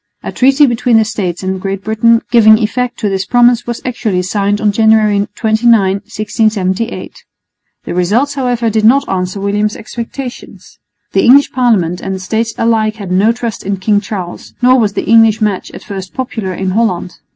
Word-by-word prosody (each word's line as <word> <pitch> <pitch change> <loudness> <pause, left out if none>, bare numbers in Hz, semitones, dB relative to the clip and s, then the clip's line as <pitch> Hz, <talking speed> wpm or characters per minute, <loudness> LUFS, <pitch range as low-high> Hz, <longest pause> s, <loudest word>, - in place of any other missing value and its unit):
A - - -5
treaty 270 +3 +3
between 240 -2 +1
the 220 - +3
States 195 -5 -4
and 190 0 -3
Great 195 0 -4
Britain 230 +2 +2
giving 220 -2 +6
effect 240 +2 -2
to 215 - 0
this 195 -1 -1
promise 240 +2 +2
was 240 -1 -5
actually 215 -7 -2
signed 200 +2 -1
on 210 -1 +1
January 215 -1 +2
29, 225 +1 +3
1678. 205 +1 -2 0.6
The - - -5
results, 215 +11 0
however, 245 -4 -1
did 220 0 0
not 260 +6 +4
answer 185 +1 -3
William's 205 +2 -1
expectations. 245 +2 -8 0.3
The - - +1
English 280 +3 +5
Parliament 205 -9 0
and 190 - -4
the - - -6
States 220 +4 -2
alike 220 -2 +1
had 200 -5 -8
no 195 +5 +3
trust 235 -2 -5
in 200 0 -2
King 205 +2 +1
Charles, 200 -5 -7
nor 255 +1 +4
was 210 -3 0
the - - -3
English 225 -1 +4
match 210 -4 -2
at - - -11
first 190 -2 -8
popular 235 -7 -4
in 185 +1 -3
Holland. 185 -4 -2
220 Hz, 175 wpm, -13 LUFS, 195-235 Hz, 0.6 s, giving